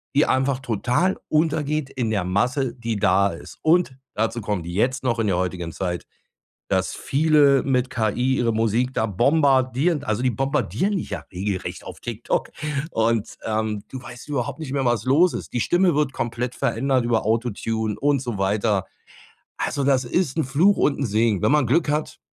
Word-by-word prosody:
die 145 Hz, -, +5 dB
einfach 130 Hz, 0 st, +1 dB
total 125 Hz, -, 0 dB
untergeht 155 Hz, -2 st, 0 dB
in 120 Hz, -5 st, -2 dB
der 100 Hz, -4 st, 0 dB
Masse, 120 Hz, -, 0 dB
die 115 Hz, -3 st, -3 dB
da 100 Hz, +1 st, +3 dB
ist. 85 Hz, -, -10 dB
Und 165 Hz, -3 st, +3 dB, 0.2 s
dazu 115 Hz, +2 st, -1 dB
kommt 100 Hz, -5 st, -3 dB
jetzt 125 Hz, +9 st, 0 dB
noch 120 Hz, -2 st, +1 dB
in 115 Hz, -, +1 dB
der 90 Hz, -2 st, +1 dB
heutigen 90 Hz, -2 st, -2 dB
Zeit, 90 Hz, -1 st, -3 dB, 0.6 s
dass -, -, 0 dB
viele 145 Hz, -2 st, +3 dB
mit 130 Hz, -1 st, +1 dB
KI 125 Hz, +3 st, 0 dB
ihre 115 Hz, -1 st, +1 dB
Musik 115 Hz, +4 st, +1 dB
da 110 Hz, -, +1 dB
bombardieren. 135 Hz, -, +2 dB
Also, 110 Hz, -2 st, -1 dB
die 130 Hz, -, +3 dB
bombardieren 150 Hz, -, 0 dB
dich -, -, -5 dB
ja -, -, -4 dB
regelrecht 95 Hz, +1 st, -4 dB
auf -, -, -9 dB
TikTok 120 Hz, -1 st, -2 dB, 0.4 s
und, 115 Hz, -1 st, 0 dB
ähm, 110 Hz, -1 st, -1 dB
du 130 Hz, -, -7 dB
weißt 125 Hz, +2 st, -11 dB
überhaupt 140 Hz, +1 st, -2 dB
nicht 140 Hz, -4 st, -5 dB
mehr, 140 Hz, -1 st, 0 dB
was 120 Hz, -2 st, +1 dB
los 160 Hz, +8 st, +4 dB
ist. -, -, -6 dB
Die 120 Hz, -, 0 dB
Stimme 175 Hz, +2 st, +3 dB
wird 150 Hz, -2 st, +1 dB
komplett 120 Hz, +1 st, -3 dB
verändert 130 Hz, +1 st, 0 dB
über 115 Hz, -3 st, +1 dB
„AutoTune“ 110 Hz, -1 st, -1 dB
und 140 Hz, -2 st, +2 dB
so 120 Hz, -6 st, -4 dB
weiter. 100 Hz, 0 st, +1 dB, 0.7 s
Also, 140 Hz, -, -1 dB
das 135 Hz, -2 st, +3 dB
ist 140 Hz, +2 st, 0 dB
'n 160 Hz, -, +2 dB
Fluch 160 Hz, +10 st, +3 dB
und 145 Hz, -, +1 dB
'n 140 Hz, -, 0 dB
Segen. 110 Hz, -2 st, +1 dB
Wenn -, -, +3 dB
man 150 Hz, -4 st, +3 dB
Glück 155 Hz, +5 st, +2 dB
hat, 150 Hz, +1 st, -2 dB
125 Hz, 180 wpm, -23 LUFS, 110-140 Hz, 0.7 s, die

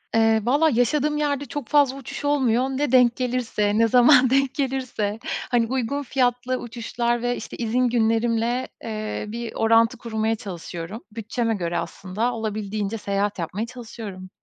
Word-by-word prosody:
Eee, 225 Hz, 0 st, +4 dB
valla, 290 Hz, +6 st, +4 dB
yaşadığım 295 Hz, +4 st, +1 dB
yerde 285 Hz, -1 st, 0 dB
çok 280 Hz, -1 st, -6 dB
fazla 285 Hz, -3 st, +3 dB
uçuş 275 Hz, +2 st, -7 dB
olmuyor. 260 Hz, -5 st, +2 dB
Ne 270 Hz, 0 st, -1 dB
denk 250 Hz, -2 st, +5 dB
gelirse, 245 Hz, -5 st, 0 dB
ne 230 Hz, 0 st, +5 dB
zaman 250 Hz, +2 st, +6 dB
denk 270 Hz, 0 st, +2 dB
gelirse... 255 Hz, -7 st, -2 dB, 0.3 s
Hani, 235 Hz, -2 st, +3 dB
uygun 265 Hz, +3 st, -1 dB
fiyatlı 250 Hz, -1 st, 0 dB
uçuşlar 235 Hz, 0 st, -2 dB
ve, 245 Hz, 0 st, 0 dB
işte, 230 Hz, -, -8 dB
izin 245 Hz, +2 st, +1 dB
günlerimle, 230 Hz, +1 st, +1 dB, 0.2 s
eee, 215 Hz, -1 st, -4 dB
bir 230 Hz, +2 st, -5 dB
orantı 230 Hz, +2 st, +3 dB
kurmaya 220 Hz, -1 st, -1 dB
çalışıyorum. 180 Hz, 0 st, -7 dB
Bütçeme 225 Hz, +1 st, -2 dB
göre 175 Hz, -3 st, -2 dB
aslında 210 Hz, +6 st, -2 dB
olabildiğince 215 Hz, -1 st, -3 dB
seyahat 200 Hz, -1 st, -1 dB
yapmaya 185 Hz, +7 st, -3 dB
çalışıyorum. 220 Hz, -6 st, -9 dB
235 Hz, 145 wpm, -23 LUFS, 220-255 Hz, 0.3 s, zaman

